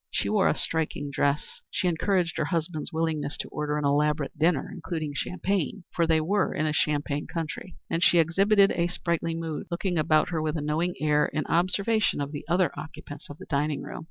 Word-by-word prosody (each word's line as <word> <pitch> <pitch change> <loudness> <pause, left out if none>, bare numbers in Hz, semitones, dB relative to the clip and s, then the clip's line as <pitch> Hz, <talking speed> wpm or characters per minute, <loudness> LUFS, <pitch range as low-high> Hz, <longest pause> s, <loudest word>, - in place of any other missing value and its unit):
She - - -1
wore 210 -3 +3
a - - +1
striking 150 -3 -1
dress; 140 +1 -1
she 185 - 0
encouraged 175 0 +1
her 155 - +1
husband's 165 -1 -2
willingness 160 -3 -1
to - - -4
order 150 0 -2
an 150 - -1
elaborate 150 +1 +1
dinner, 160 0 +2
including 155 -5 -4
champagne 185 +3 -2
(for 170 -1 +2
they 160 -1 +4
were 195 +6 +1
in 155 - 0
a 155 - 0
champagne 150 -1 0
country), 165 +2 -5
and 165 - 0
she 175 - +5
exhibited 195 +5 +4
a 170 0 +1
sprightly 170 -1 -1
mood, 165 -2 -4
looking 175 0 -1
about 155 0 +3
her 165 -3 -1
with 155 +1 -1
a - - -2
knowing 160 +4 0
air 150 -1 +3
in 155 +3 -2
observation 195 +5 +1
of 145 0 -3
the 145 - -6
other 175 -2 +3
occupants 155 -2 -9
of 145 - -9
the - - -10
dining 145 0 -1
room. - - -7
160 Hz, 200 wpm, -27 LUFS, 150-175 Hz, -, she